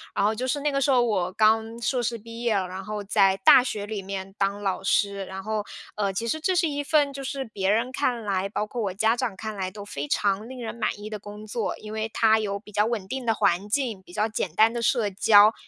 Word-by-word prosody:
然 -, -, +1 dB
后 215 Hz, -, +3 dB
就 250 Hz, +4 st, -3 dB
是 285 Hz, +2 st, -1 dB
那 295 Hz, +1 st, +1 dB
个 275 Hz, -, 0 dB
时 275 Hz, +1 st, +1 dB
候， 250 Hz, -2 st, +5 dB
我 190 Hz, -6 st, 0 dB
刚 220 Hz, +2 st, +2 dB
硕 245 Hz, +2 st, 0 dB
士 235 Hz, 0 st, -1 dB
毕 230 Hz, +1 st, -10 dB
业 235 Hz, -3 st, +1 dB
了， 190 Hz, -2 st, 0 dB
然 185 Hz, +1 st, -7 dB
后 210 Hz, -1 st, -4 dB
在 195 Hz, -1 st, +3 dB
大 245 Hz, -, +8 dB
学 210 Hz, -5 st, -3 dB
里 205 Hz, -1 st, -4 dB
面 195 Hz, 0 st, -6 dB
当 200 Hz, +1 st, -1 dB
老 190 Hz, -2 st, -1 dB
师。 200 Hz, 0 st, +1 dB
然 190 Hz, +1 st, -7 dB
后， 215 Hz, 0 st, -2 dB, 0.3 s
呃， 200 Hz, -2 st, -1 dB
其 230 Hz, +4 st, -2 dB
实 315 Hz, +7 st, -1 dB
这 370 Hz, +4 st, +1 dB
是 350 Hz, -1 st, +3 dB
一 290 Hz, 0 st, -2 dB
份 290 Hz, -1 st, +2 dB
就 275 Hz, 0 st, -6 dB
是 270 Hz, 0 st, -3 dB
别 200 Hz, -4 st, -2 dB
人 230 Hz, +5 st, +1 dB
看 250 Hz, -4 st, -1 dB
来， 195 Hz, -2 st, -1 dB
包 210 Hz, -, -2 dB
括 235 Hz, +3 st, -5 dB
我 195 Hz, -4 st, -2 dB
家 220 Hz, +4 st, +2 dB
长 240 Hz, -5 st, -2 dB
看 215 Hz, +2 st, -6 dB
来， 190 Hz, -2 st, -3 dB
都 205 Hz, +1 st, -9 dB
非 145 Hz, -8 st, -5 dB
常 200 Hz, +7 st, 0 dB
令 260 Hz, 0 st, -9 dB
人 225 Hz, -, -4 dB
满 220 Hz, -3 st, -1 dB
意 210 Hz, +1 st, -7 dB
的 215 Hz, -1 st, -5 dB
工 210 Hz, +1 st, -10 dB
作。 215 Hz, 0 st, -3 dB
因 215 Hz, -, -9 dB
为 220 Hz, 0 st, -2 dB
它 220 Hz, -1 st, +4 dB
有 200 Hz, -2 st, -2 dB
比 210 Hz, 0 st, -15 dB
较 210 Hz, 0 st, +2 dB
稳 220 Hz, -4 st, -2 dB
定 260 Hz, +1 st, -4 dB
的 225 Hz, -, +3 dB
环 180 Hz, +1 st, +1 dB
境， 230 Hz, -5 st, -1 dB
比 175 Hz, -, -16 dB
较 215 Hz, +2 st, +1 dB
简 195 Hz, -6 st, -3 dB
单 220 Hz, +3 st, +5 dB
的 235 Hz, 0 st, -3 dB
社 230 Hz, -2 st, +2 dB
交。 205 Hz, +2 st, +6 dB
215 Hz, 285 characters per minute, -25 LUFS, 200-235 Hz, 0.3 s, 大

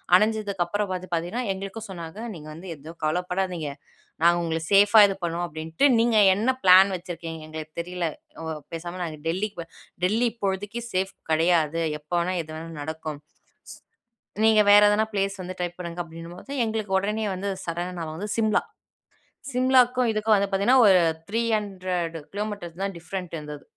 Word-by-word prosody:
அடைஞ்சதுக்கு 205 Hz, -2 st, +2 dB
அப்புறம் 205 Hz, +3 st, -2 dB
பார்த்து 185 Hz, 0 st, -4 dB
பார்த்தீங்கன்னா 175 Hz, +9 st, -1 dB
எங்களுக்கும் 195 Hz, +4 st, -7 dB
சொன்னாங்க 170 Hz, +1 st, -8 dB, 0.2 s
"நீங்க 155 Hz, -2 st, -10 dB
வந்து 170 Hz, +5 st, -10 dB
எதுவும் 155 Hz, +3 st, -12 dB
கவலைப்படாதீங்க. 180 Hz, +1 st, -1 dB, 0.6 s
நாங்க 170 Hz, +1 st, +6 dB
உங்கள 165 Hz, -1 st, -1 dB
சேஃப்பா 205 Hz, +2 st, +7 dB
இது 195 Hz, -, -2 dB
பண்ணுவோம் 170 Hz, +1 st, -1 dB
அப்டின்ட்டு 160 Hz, -, -1 dB
நீங்க 230 Hz, -1 st, +3 dB, 0.2 s
என்ன 220 Hz, +6 st, 0 dB
பிளான் 190 Hz, +1 st, +8 dB
வச்சிருக்கீங்கன்னு 165 Hz, -3 st, -7 dB
எங்களுக்கு 155 Hz, 0 st, -8 dB
தெரியல 180 Hz, 0 st, -3 dB, 0.4 s
உ -, -, -5 dB, 0.3 s
பேசாம 175 Hz, +2 st, -5 dB
நாங்க 160 Hz, -3 st, -5 dB
டெல்லிக்கு 185 Hz, +1 st, -2 dB, 0.4 s
டெல்லி 220 Hz, +6 st, +2 dB
இப்போழுதைக்கி 205 Hz, +1 st, -3 dB
சேஃப் 190 Hz, +1 st, 0 dB, 0.2 s
கிடையாது. 165 Hz, 0 st, +2 dB, 0.2 s
எப்போ 150 Hz, +3 st, -12 dB
வேணா 175 Hz, +2 st, 0 dB
எது 155 Hz, -, -12 dB
வேணா 165 Hz, +1 st, -7 dB
நடக்கும். 155 Hz, -1 st, -5 dB, 1.2 s
சோ -, -, -7 dB
நீங்க 220 Hz, -1 st, +6 dB
வேற 205 Hz, 0 st, +8 dB
எதனா 215 Hz, +1 st, +2 dB
பிளேஸ் 195 Hz, 0 st, -1 dB
வந்து 185 Hz, +1 st, -7 dB
ட்ரை 175 Hz, -1 st, -1 dB
பண்ணுங்க." 175 Hz, -1 st, -4 dB
அப்டின்னும்போது 170 Hz, +9 st, -10 dB
எங்களுக்கு 215 Hz, -3 st, -1 dB
உடனே 210 Hz, +2 st, -1 dB
வந்து 200 Hz, +2 st, -3 dB, 0.2 s
சடனா 175 Hz, +2 st, -3 dB
நாபங்க 155 Hz, -1 st, -5 dB
வந்து 205 Hz, +3 st, -4 dB
சிம்லா, 220 Hz, -1 st, +2 dB, 0.9 s
சிம்லாக்கும் 250 Hz, -1 st, +4 dB
இதுக்கும் 215 Hz, 0 st, +3 dB
வந்து 200 Hz, 0 st, 0 dB
பார்த்தீங்கன்னா, 235 Hz, +7 st, +4 dB
ஒரு 190 Hz, -2 st, +7 dB, 0.3 s
300 195 Hz, -7 st, -1 dB, 0.2 s
கிலோமீட்டர் 200 Hz, -4 st, -5 dB
தான் 195 Hz, -2 st, -3 dB
டிஃபரண்ட் 180 Hz, 0 st, -6 dB
இருந்தது. 150 Hz, -1 st, -8 dB
185 Hz, 155 wpm, -25 LUFS, 165-210 Hz, 1.2 s, பிளான்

